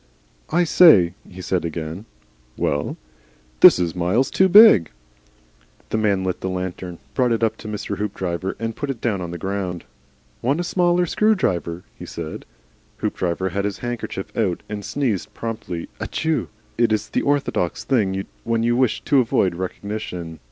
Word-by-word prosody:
"I 175 Hz, +2 st, +3 dB
say," 150 Hz, -, +6 dB, 0.2 s
he 90 Hz, 0 st, -10 dB
said 90 Hz, -2 st, 0 dB
again. 80 Hz, +4 st, -5 dB, 0.5 s
"Well?" 70 Hz, 0 st, -1 dB, 0.6 s
"This -, -, +9 dB
is 85 Hz, -1 st, -1 dB
miles 95 Hz, +10 st, +1 dB
too 190 Hz, 0 st, +4 dB
big." 200 Hz, -, +8 dB, 1.0 s
The -, -, 0 dB
man 100 Hz, -3 st, +1 dB
lit 90 Hz, -1 st, -2 dB
the 95 Hz, -, -2 dB
lantern, 90 Hz, -1 st, -5 dB, 0.2 s
brought 125 Hz, -2 st, +2 dB
it 115 Hz, 0 st, 0 dB
up 110 Hz, -1 st, +2 dB
to -, -, -10 dB
Hoopdriver 100 Hz, -3 st, -3 dB
and 115 Hz, 0 st, -4 dB
put 145 Hz, -, -4 dB
it 130 Hz, -4 st, -3 dB
down 105 Hz, -6 st, -1 dB
on 85 Hz, -, -4 dB
the 85 Hz, -, -5 dB
ground. 95 Hz, -1 st, -3 dB, 0.6 s
"Want 140 Hz, +7 st, +1 dB
a -, -, 0 dB
smaller 175 Hz, 0 st, +2 dB
screwdriver?" 95 Hz, -, 0 dB, 0.2 s
he -, -, -8 dB
said. 80 Hz, -2 st, -7 dB, 0.5 s
Hoopdriver 90 Hz, +1 st, -1 dB
had 100 Hz, +2 st, -2 dB
his 100 Hz, -1 st, -2 dB
handkerchief 120 Hz, -5 st, -5 dB
out 95 Hz, -7 st, 0 dB
and 105 Hz, -1 st, -5 dB
sneezed 115 Hz, -6 st, -1 dB
a -, -, -33 dB
prompt 115 Hz, -2 st, -5 dB
ATICHEW. 150 Hz, -, -3 dB, 0.3 s
It 120 Hz, -2 st, +3 dB
is 110 Hz, 0 st, 0 dB
the -, -, 0 dB
orthodox 140 Hz, -11 st, 0 dB
thing 95 Hz, -7 st, 0 dB, 0.2 s
when 115 Hz, -1 st, 0 dB
you 120 Hz, +1 st, +2 dB
wish 130 Hz, -2 st, +1 dB
to 140 Hz, -, +3 dB
avoid 115 Hz, -6 st, +2 dB
recognition. 90 Hz, -2 st, -5 dB
100 Hz, 160 wpm, -22 LUFS, 90-120 Hz, 1.0 s, This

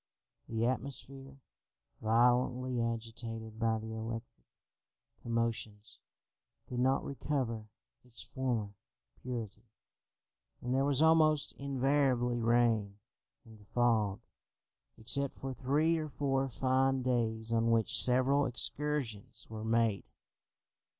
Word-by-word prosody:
The 115 Hz, 0 st, 0 dB
atmosphere, 135 Hz, +1 st, -4 dB, 0.6 s
violently 125 Hz, +2 st, +2 dB
agitated 115 Hz, -1 st, -5 dB
by 115 Hz, -1 st, +2 dB
the 110 Hz, 0 st, -6 dB
electric 115 Hz, -, -7 dB, 0.7 s
commotions, 115 Hz, -2 st, -3 dB, 0.7 s
could 125 Hz, -, -4 dB
not 130 Hz, +2 st, +2 dB
recover 130 Hz, -6 st, -2 dB, 0.4 s
its 125 Hz, -1 st, -11 dB
former 120 Hz, -6 st, -2 dB, 0.5 s
purity, 115 Hz, -3 st, -6 dB, 0.9 s
and 125 Hz, +1 st, -3 dB
there 135 Hz, +1 st, +2 dB
was 140 Hz, +1 st, +2 dB
almost 155 Hz, -2 st, +4 dB
invariably 135 Hz, -3 st, +1 dB
rain 115 Hz, -3 st, +2 dB, 0.5 s
and 110 Hz, -3 st, -16 dB
fog, 110 Hz, -5 st, +2 dB, 0.8 s
except 140 Hz, +5 st, +1 dB
for 135 Hz, 0 st, -5 dB
three 150 Hz, +6 st, +1 dB
or 155 Hz, -1 st, -4 dB
four 135 Hz, -1 st, 0 dB
fine 130 Hz, +1 st, +1 dB
days 115 Hz, -2 st, 0 dB
on 115 Hz, 0 st, +2 dB
which 115 Hz, -1 st, +2 dB
several 130 Hz, +3 st, +3 dB
excursions 130 Hz, -3 st, -2 dB
were 110 Hz, -1 st, -6 dB
made. 115 Hz, -2 st, +1 dB
120 Hz, 100 wpm, -33 LUFS, 115-135 Hz, 0.9 s, almost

